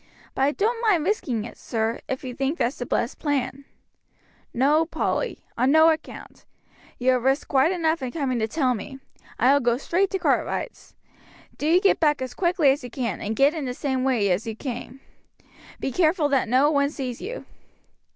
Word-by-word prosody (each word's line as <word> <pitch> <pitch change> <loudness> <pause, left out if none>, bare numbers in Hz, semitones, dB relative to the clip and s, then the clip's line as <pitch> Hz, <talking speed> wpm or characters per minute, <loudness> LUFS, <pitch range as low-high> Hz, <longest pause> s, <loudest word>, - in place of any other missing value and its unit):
But - - -3
I 275 +2 +4
don't 455 +6 0
mind 405 -9 +2
risking 260 - -1
it, - - -11
sir, 225 0 -2
if 260 - -4
you 255 -1 -5
think 270 +6 -2
that's 245 +1 -1
the 245 - -4
best 235 - -1
plan." 280 -2 -2 0.9
"No, 285 +6 +3
Polly; 325 - -2
on 255 +3 +2
no 315 +2 +6
account. 315 0 -7 0.5
You 255 +1 +2
have 250 -2 +1
risked 270 +2 +1
quite 275 +5 +3
enough 330 -3 0
in 260 - -3
coming 265 -5 -1
to 220 - 0
tell 260 0 +1
me. 255 +5 -7 0.4
I 255 +4 +4
will 285 - +4
go 240 -2 +1
straight 365 +8 0
to 390 - -1
Cartwright's. 370 - -2 0.6
Do 295 - -3
you 340 +3 +5
get 390 +1 +3
back 295 -3 +2
as 260 -1 -5
quickly 345 -6 +3
as 275 0 -2
you 245 - -7
can, 235 -5 -3
and 215 +2 -3
get 280 +5 +4
in 310 -4 -4
the 250 -1 -4
same 265 -2 -1
way 245 -6 +2
you 220 +3 -6
came. 255 +2 -7 0.8
Be 270 - -2
very - - -11
careful 320 -3 +2
that 270 -5 +1
no 265 +5 +4
one 280 -1 +2
sees 260 -5 -5
you." 475 +6 -6
275 Hz, 200 wpm, -24 LUFS, 250-315 Hz, 0.9 s, no